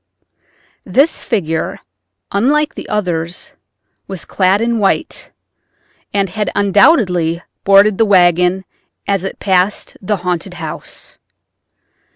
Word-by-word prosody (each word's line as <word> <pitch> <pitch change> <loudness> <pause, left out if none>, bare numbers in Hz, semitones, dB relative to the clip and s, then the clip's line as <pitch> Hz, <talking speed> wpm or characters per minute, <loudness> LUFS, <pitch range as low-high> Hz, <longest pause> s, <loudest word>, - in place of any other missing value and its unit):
This 285 +5 +1
figure, 165 -8 -2 0.5
unlike 295 +9 +1
the - - -9
others, 175 -4 -2 0.6
was 190 -3 -6
clad 190 +1 +2
in 230 0 0
white, 195 -2 -1 0.8
and 200 -1 0
had 210 +1 -2
undoubtedly 190 - +3 0.2
boarded 200 +1 +5
the 225 - +5
wagon 180 -1 +3 0.4
as 195 -2 0
it 195 - -5
passed 190 +1 0
the 205 +1 -1
haunted 180 +1 -2
house. 160 -3 -8
195 Hz, 105 wpm, -15 LUFS, 180-210 Hz, 0.8 s, boarded